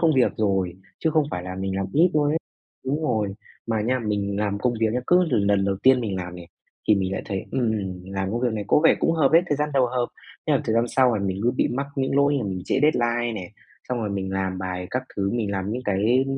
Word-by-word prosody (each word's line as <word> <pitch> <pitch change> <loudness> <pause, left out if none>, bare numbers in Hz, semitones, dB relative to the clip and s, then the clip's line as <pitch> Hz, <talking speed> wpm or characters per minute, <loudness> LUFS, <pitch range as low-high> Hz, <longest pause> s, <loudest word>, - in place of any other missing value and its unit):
công 165 -2 +4
việc 130 -2 +3
rồi, 95 -5 0 0.2
chứ 160 - +1
không 155 -1 +3
phải 90 - -3
là 90 +1 -6
mình 95 0 -3
làm 95 0 -1
ít 170 +4 +4
luôn 145 -1 +3
ấy 160 - +1 0.5
đúng 145 +4 -1
rồi. 110 -9 0 0.3
Mà 110 -2 0
nha, 125 +4 +1
mình 100 -3 -2
làm 100 -1 -1
công 120 +3 0
việc 110 -1 +2
nha, 125 - 0
cứ 180 +1 +5
l 165 - -1
lần 100 -1 +2
đầu 100 0 0
tiên 130 -1 +6
mình 105 -5 -2
làm 90 -1 -5
nè 90 -1 -10 0.4
thì 105 - +7
mình 95 -1 -1
lại - - -3
thấy, 95 -3 -3
ừm, 105 -8 -1
làm 95 0 -3
công 120 +3 -2
việc 125 -2 +1
này 105 -2 -3
có - - +4
vẻ - - +7
cũng 165 - +3
hợp 155 -4 +3
ấy, 165 +2 +7
thời 145 - 0
gian 150 +1 -1
đầu 130 -2 +4
hợp. 120 0 -1 0.4
Thế - - +2
là - - +2
thời 110 - 0
gian 115 +1 +3
sau 125 -1 +3
là 100 - -3
mình 95 0 -2
cứ 120 - +3
bị 125 - +1
mắc 140 +3 -2
những 135 0 0
lỗi 140 +1 +4
là 120 - -2
mình 95 -2 -3
trễ - - +1
deadline 120 -5 +2
nè, 95 -3 -6 0.4
xong 125 - -1
rồi 110 -3 -2
mình 95 -1 -3
làm 95 -1 -2
bài 90 -1 -4
các 130 - -1
thứ, 100 -1 0
mình 115 -3 -1
làm 95 0 -2
những 125 +2 -3
cái 110 +6 +2
110 Hz, 275 wpm, -24 LUFS, 95-130 Hz, 0.5 s, thì